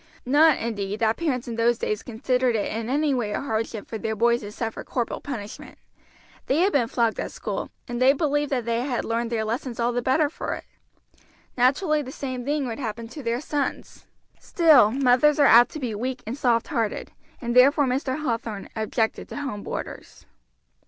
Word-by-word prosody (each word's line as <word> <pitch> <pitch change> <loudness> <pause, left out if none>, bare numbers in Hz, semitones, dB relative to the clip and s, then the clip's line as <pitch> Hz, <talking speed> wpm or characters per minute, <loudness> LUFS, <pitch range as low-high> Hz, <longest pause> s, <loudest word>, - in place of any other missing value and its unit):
Not, 295 +4 +5
indeed, 210 -2 -3
that 220 0 +3
parents 265 -8 -2
in 230 -1 -5
those 235 0 +3
days 215 -2 -2
considered 250 +1 0
it 205 - -1
in 225 +1 -3
any 290 +2 +1
way 225 -5 -1
a - - -1
hardship 225 -4 -3
for 220 - -5
their 220 0 -2
boys 235 +2 +2
to 205 -1 -7
suffer 225 +1 -4
corporal 240 -3 -3
punishment; 220 -7 -7 0.7
they 290 +5 +2
had 390 +2 +2
been 245 -5 +2
flogged 230 -2 0
at - - -3
school, - - -4 0.2
and 240 -1 -4
they 260 +1 +7
believed 290 0 0
that 250 -4 -1
they 235 0 0
had 255 -2 -2
learned 230 +1 -2
their 220 -2 -1
lessons 235 +2 -4
all 235 +1 +1
the 245 - 0
better 270 +5 +2
for 295 - -4
it. - - -9 0.9
Naturally 300 +5 +2
the 260 -2 -7
same 255 -3 -5
thing 290 0 0
would 235 0 -5
happen 230 -2 -4
to 295 - -8
their 235 0 -1
sons. 295 -2 -4 0.3
Still 310 - +5
mothers 265 +4 +3
are 290 - +5
apt 240 -1 +7
to 310 - -5
be 245 -5 -3
weak 250 +4 -4
and 225 - -4
soft 240 -3 +1
hearted, 230 -8 -2 0.3
and 240 -1 -3
therefore 280 +3 +6
Mr. 260 +3 -1
Hathorn 230 -6 -3
objected 220 +1 -1
to - - -7
home 275 -8 -4
boarders. - - -7
245 Hz, 195 wpm, -24 LUFS, 230-275 Hz, 0.9 s, they